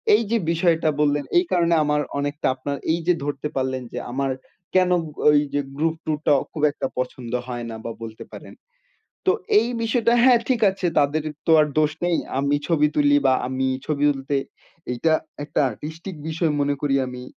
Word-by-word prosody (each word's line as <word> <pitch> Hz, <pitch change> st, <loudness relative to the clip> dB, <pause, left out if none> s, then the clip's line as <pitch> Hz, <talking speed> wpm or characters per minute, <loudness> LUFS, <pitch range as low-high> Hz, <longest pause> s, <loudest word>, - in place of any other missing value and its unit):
এইযে 230 Hz, +1 st, +1 dB
বিষয়টা 165 Hz, -2 st, +2 dB
বললেন 145 Hz, -1 st, +2 dB
এই 360 Hz, -, +4 dB
কারণে 170 Hz, -1 st, +3 dB
আমার 150 Hz, 0 st, +1 dB, 0.2 s
অনেকটা 145 Hz, +1 st, -2 dB
আপনার 140 Hz, +2 st, -4 dB
এইযে 170 Hz, +2 st, +1 dB
ধরতে 145 Hz, 0 st, -3 dB
পারলেন 130 Hz, -1 st, -1 dB
যে -, -, -5 dB
আমার 135 Hz, +1 st, -1 dB, 0.4 s
কেনো 180 Hz, -1 st, +4 dB, 0.3 s
ওইযে 145 Hz, -1 st, +2 dB, 0.2 s
গ্রুপ 160 Hz, +1 st, +1 dB
ট্যুরটা 155 Hz, -1 st, 0 dB, 0.2 s
খুব 155 Hz, -, -5 dB
একটা 140 Hz, -, -3 dB
পছন্দ 125 Hz, -2 st, -4 dB, 0.2 s
হয় 120 Hz, -2 st, -4 dB
না 115 Hz, -, -6 dB
বা 115 Hz, -, -3 dB
বলতে 110 Hz, -1 st, -8 dB
পারেন। -, -, -10 dB, 0.7 s
তো 375 Hz, -, +5 dB, 0.3 s
এই 230 Hz, -, 0 dB
বিষয়টা, 230 Hz, +1 st, +2 dB
হ্যা, 255 Hz, -1 st, +7 dB
ঠিক 240 Hz, -3 st, +1 dB
আছে 190 Hz, -1 st, -5 dB
তাদের 150 Hz, +2 st, +1 dB, 0.2 s
তো 165 Hz, -, +4 dB
আর 150 Hz, -, +2 dB
দোষ 150 Hz, 0 st, +3 dB
নেই। 175 Hz, -1 st, +2 dB, 0.2 s
আমি 140 Hz, +1 st, +1 dB
ছবি 150 Hz, -3 st, +3 dB
তুলি 145 Hz, -1 st, +4 dB
বা 130 Hz, -, +5 dB
আমি 130 Hz, 0 st, -1 dB, 0.2 s
ছবি 145 Hz, -2 st, -1 dB
তুলতে 135 Hz, 0 st, -2 dB, 0.5 s
এইটা 155 Hz, +7 st, +1 dB, 0.3 s
একটা 145 Hz, -, -2 dB
আর্টিস্টিক 160 Hz, -, -8 dB
বিষয় 160 Hz, 0 st, 0 dB
মনে 145 Hz, 0 st, +1 dB
করি 140 Hz, -2 st, +1 dB
আমি। 125 Hz, 0 st, -7 dB
150 Hz, 175 wpm, -23 LUFS, 140-170 Hz, 0.7 s, হ্যা